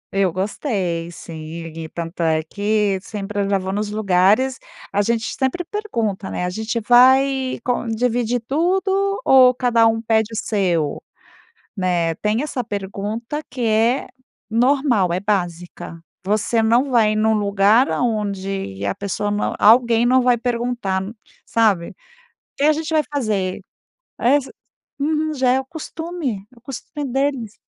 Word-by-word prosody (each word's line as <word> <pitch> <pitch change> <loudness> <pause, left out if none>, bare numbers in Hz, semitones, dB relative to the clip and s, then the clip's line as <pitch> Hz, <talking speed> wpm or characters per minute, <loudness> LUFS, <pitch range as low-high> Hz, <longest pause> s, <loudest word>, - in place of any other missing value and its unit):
Eu 195 -3 +2
gostei, 185 - -2
sim. 165 -2 -9 0.3
E 160 -1 -6
tanto 170 +1 -6
é 160 -1 +1
que, 205 +2 0
sempre 205 0 -4
eu 200 - -1
já 200 - +3
vou 190 0 -4
nos 210 0 -2
lugares, 210 +5 +2 0.3
a 205 - +3
gente 225 +2 0
sempre 265 +7 -1
pergunta, 230 - -3
né. 180 - -3
A 180 - -2
gente 220 +4 -2
vai 260 +3 +4
con 245 -1 -1
dividir 240 +1 0
tudo 385 +6 +1
ou 255 -1 +6
cada 240 -2 +3 0.2
pede 220 0 +2
o - - -6
seu, 175 -8 0 0.8
né. 175 -3 0
Tem 210 +6 0
essa 280 -4 -3
pergunta, 210 +6 -4
que 255 - -7
é 230 +3 +2 0.4
normal. 240 - +2
É 180 - 0
básica. 175 -4 -3 0.2
Você 215 +3 +1
não 240 +5 +3
vai 220 -4 +3
num 220 +1 +2
lugar 205 +4 +3
aonde 195 - -2
a 100 - -1
pessoa 205 +1 -3
não 205 0 -1
alguém 230 +1 +5
não 255 +2 +4
vai 250 -1 +4
perguntar 235 -5 -2
n 200 +3 -7 0.3
sabe? 210 -7 +2
"O - - -19 0.6
que 280 - 0
a 310 - +6
gente 320 +1 -4
vai 310 -1 +3
fazer?" 210 -8 -1 0.6
Esse 270 +3 +2 0.5
Uhum. 310 +1 0
Já 260 -3 +1
é 265 - +2
o 265 - -6
costume. 315 - -5
É 245 - -22
o - - -19
costume 270 +4 -7
deles. 270 -5 -1
220 Hz, 150 wpm, -20 LUFS, 195-255 Hz, 0.8 s, ou